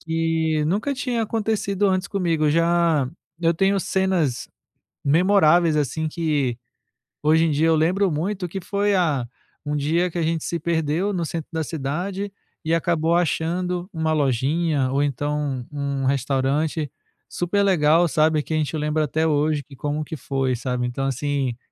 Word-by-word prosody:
que 160 -1 0
nunca 205 - 0
tinha 250 -3 -1
acontecido 210 -2 0
antes 185 0 +1
comigo. 165 -6 +1
Já 165 -3 +2 0.3
eu 165 -1 +3
tenho 195 +3 +2
cenas 185 -10 0 0.6
memoráveis 170 0 +4
assim 150 +2 -1
que 150 -7 -1 0.7
hoje 160 +2 +4
em - - +1
dia, 150 +2 +2
eu 165 - +4
lembro 185 +5 +2
muito 180 +5 -2
que 195 +3 -5
foi 200 +3 0
a 155 -9 +1 0.4
um 150 0 -2
dia 160 +5 +1
que 175 - -5
a - - 0
gente 165 0 -1
se 170 - -2
perdeu 165 +4 0
no 175 -3 -1
centro 160 -1 -5
da 160 -1 -1
cidade 175 +8 -3 0.3
e 160 - 0
acabou 165 -1 +1
achando 175 +1 -1
uma 160 -1 0
lojinha 145 +1 +1
ou 140 +1 +2
então 145 -2 -2
um 140 -1 -2
um - - -1
restaurante 140 +3 0 0.4
super 180 +3 0
legal, 170 -3 +4
sabe, 155 -1 +2
que 160 - -4
a - - +2
gente 155 0 -1
lembra 150 +1 0
até 160 +2 0
hoje 150 -1 +1
que 140 - -14
como 145 +3 -2
que 160 - -6
foi, 135 -2 -1
sabe. 125 0 -2
Então 125 +2 -3
assim, 135 -2 -1
160 Hz, 165 wpm, -23 LUFS, 145-175 Hz, 0.7 s, memoráveis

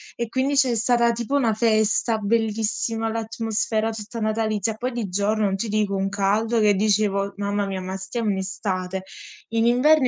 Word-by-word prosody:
e 235 -1 -3
quindi 265 +3 0
c'è 265 -3 +4
stata 235 +1 +3
tipo 235 +4 -2
una 235 -6 +2
festa 220 0 +2
bellissima, 225 +1 0
l'atmosfera 225 0 -1
tutta 220 +1 -7
natalizia. 215 -1 0
Poi 245 +4 -3
di 225 -5 -3
giorno 205 +3 0
non 195 - +1
ti 225 - -2
dico 205 -1 0
un 195 0 0
caldo 215 +4 +1
che 210 -1 +4
dicevo: 200 -1 +1
"Mamma 205 0 -1
mia, 190 -1 -3
ma 185 +1 -5
stiamo 210 +4 -3
in 190 - -1
estate". 190 -1 -3 0.5
In 225 0 +1
inverno 265 +3 +4
220 Hz, 175 wpm, -23 LUFS, 200-230 Hz, 0.5 s, c'è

